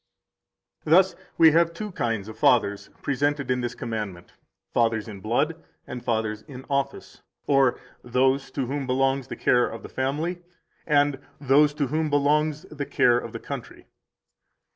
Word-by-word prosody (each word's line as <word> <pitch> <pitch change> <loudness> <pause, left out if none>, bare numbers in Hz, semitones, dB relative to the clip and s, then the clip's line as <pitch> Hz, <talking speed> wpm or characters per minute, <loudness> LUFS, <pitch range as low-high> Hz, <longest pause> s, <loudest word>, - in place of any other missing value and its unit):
158 160 +3 +5 0.2
Thus - - -25
we 160 -1 +7
have 170 +1 +3
two 210 +2 -5
kinds 115 - -2
of 110 - -8
fathers 100 -5 +2
presented 145 -1 0
in 125 0 0
this 120 0 -3
commandment, 105 -7 -5 0.4
fathers 115 -2 +1
in 105 -3 -8
blood 145 - -1 0.2
and 125 -1 -7
fathers 110 -2 -1
in 130 -3 -10
office, 140 0 -3 0.2
or 135 -3 +3 0.2
those 130 +3 +1
to 135 - -3
whom 135 +1 -3
belongs 135 0 +1
the - - -6
care 125 0 +3
of 115 - -8
the - - -9
family, 155 +7 -2 0.5
and 145 -2 +3 0.2
those 145 +2 +4
to 145 - 0
whom 155 +3 -1
belongs 150 +2 +1
the 145 -5 -6
care 120 0 +3
of - - -8
the - - -6
country. - - -8
135 Hz, 160 wpm, -25 LUFS, 120-150 Hz, 0.5 s, we